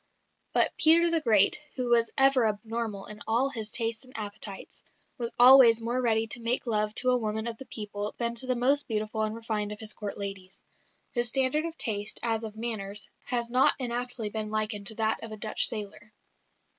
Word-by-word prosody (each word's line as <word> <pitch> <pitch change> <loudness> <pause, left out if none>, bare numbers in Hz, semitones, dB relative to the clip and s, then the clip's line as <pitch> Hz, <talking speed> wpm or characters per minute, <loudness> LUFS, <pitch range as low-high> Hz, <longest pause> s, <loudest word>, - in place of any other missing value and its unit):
But - - +2
Peter 335 +2 +5
the 330 -1 +2
Great, 215 -4 +4
who 250 -2 -3
was 230 -1 +3
ever 270 -3 +5
abnormal 215 -1 -4
in 210 0 -11
all 240 +5 +1
his 220 -5 -4
tastes 230 0 -1
and 255 - -17
appetites, 205 -2 -7 0.4
was 235 -1 -3
always 245 -2 +8
more 240 +2 -2
ready 225 -2 +2
to 235 +1 -5
make 235 +3 0
love 215 -2 0
to 255 0 +3
a 250 - +3
woman 220 0 -3
of 230 -1 -5
the 265 - -10
people 210 -1 -5
than 235 -1 -1
to 235 +2 -2
the 255 - +1
most 275 +4 +1
beautiful 215 -1 -2
and 215 0 -2
refined 220 -2 -3
of 210 - -7
his 215 -1 -2
Court 205 -1 -6
ladies. 195 -2 -7 0.5
His 240 -1 +1
standard 270 +5 +1
of 335 0 -6
taste, 210 -2 -2
as 225 -1 0
of 220 -1 -7
manners, 210 -3 -3 0.2
has 235 -2 -2
not 255 +2 +4
inaptly 245 -3 -3
been 215 0 -4
likened 215 -1 -2
to 220 - +1
that 220 0 -1
of 225 - -7
a 215 - -7
Dutch 215 +1 +2
sailor. 210 0 -6
225 Hz, 200 wpm, -28 LUFS, 215-245 Hz, 0.5 s, always